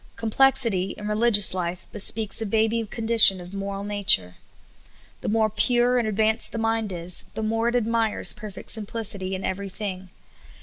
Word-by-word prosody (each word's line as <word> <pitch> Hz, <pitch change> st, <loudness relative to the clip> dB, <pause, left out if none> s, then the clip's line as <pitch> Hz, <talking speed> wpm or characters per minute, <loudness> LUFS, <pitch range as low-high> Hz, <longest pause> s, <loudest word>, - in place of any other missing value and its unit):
Complexity 230 Hz, -4 st, +1 dB
in 210 Hz, -, -8 dB
religious 210 Hz, -2 st, +3 dB
life 180 Hz, 0 st, -5 dB
bespeaks 215 Hz, +1 st, +3 dB
a 220 Hz, -, -3 dB
baby 225 Hz, +2 st, 0 dB
condition 225 Hz, -3 st, +4 dB
of 180 Hz, +1 st, -12 dB
moral 195 Hz, 0 st, -6 dB
nature. 200 Hz, -, +3 dB, 0.9 s
The -, -, -4 dB
more 220 Hz, 0 st, +1 dB
pure 240 Hz, +3 st, +1 dB
and 230 Hz, -, -2 dB
advanced 220 Hz, +1 st, 0 dB
the -, -, -5 dB
mind 225 Hz, -2 st, -2 dB
is, 175 Hz, 0 st, -2 dB
the 220 Hz, -, -4 dB
more 225 Hz, +2 st, -2 dB
it 240 Hz, -, -1 dB
ad 240 Hz, -3 st, 0 dB
mires 230 Hz, -1 st, +1 dB
perfect 210 Hz, -2 st, -8 dB
simplicity 205 Hz, -3 st, -1 dB
in 185 Hz, -, -7 dB
every 195 Hz, +1 st, -5 dB
thing. 190 Hz, -2 st, -7 dB
215 Hz, 165 wpm, -23 LUFS, 195-225 Hz, 0.9 s, condition